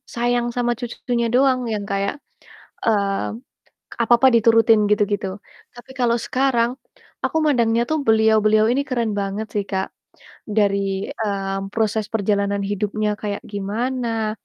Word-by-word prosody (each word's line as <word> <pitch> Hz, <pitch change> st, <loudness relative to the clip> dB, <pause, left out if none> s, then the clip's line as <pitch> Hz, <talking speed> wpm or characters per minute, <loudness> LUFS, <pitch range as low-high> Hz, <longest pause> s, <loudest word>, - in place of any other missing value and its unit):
sayang 240 Hz, 0 st, +1 dB
sama 240 Hz, -1 st, +1 dB
cucu-cucunya 240 Hz, -1 st, -2 dB
doang, 260 Hz, -1 st, +3 dB
yang 205 Hz, -1 st, -3 dB
kayak, 200 Hz, 0 st, 0 dB, 0.7 s
mmm, 205 Hz, 0 st, 0 dB, 0.6 s
apa-apa 240 Hz, +3 st, +5 dB
diturutin 225 Hz, -1 st, +5 dB
gitu 210 Hz, 0 st, +4 dB
gitu. 195 Hz, -1 st, -2 dB, 0.5 s
Tapi 240 Hz, +2 st, -13 dB
kalau 235 Hz, -1 st, +3 dB
sekarang 255 Hz, -3 st, +1 dB, 0.5 s
aku 320 Hz, -, 0 dB
mandangnya 235 Hz, -5 st, +2 dB
tuh 315 Hz, -, +1 dB
beliau-beliau 220 Hz, -1 st, +4 dB
ini 275 Hz, +3 st, +1 dB
keren 235 Hz, -4 st, 0 dB
banget 200 Hz, +2 st, -3 dB
sih, 205 Hz, -, 0 dB
Kak, 190 Hz, 0 st, -1 dB, 0.6 s
dari, 200 Hz, -2 st, 0 dB
mmm, 195 Hz, -2 st, -3 dB
proses 220 Hz, -1 st, 0 dB
perjalanan 200 Hz, -1 st, 0 dB
hidupnya 210 Hz, +1 st, -1 dB
kayak 205 Hz, -1 st, -3 dB
gimana, 225 Hz, +2 st, -2 dB
220 Hz, 125 wpm, -21 LUFS, 200-240 Hz, 0.7 s, apa-apa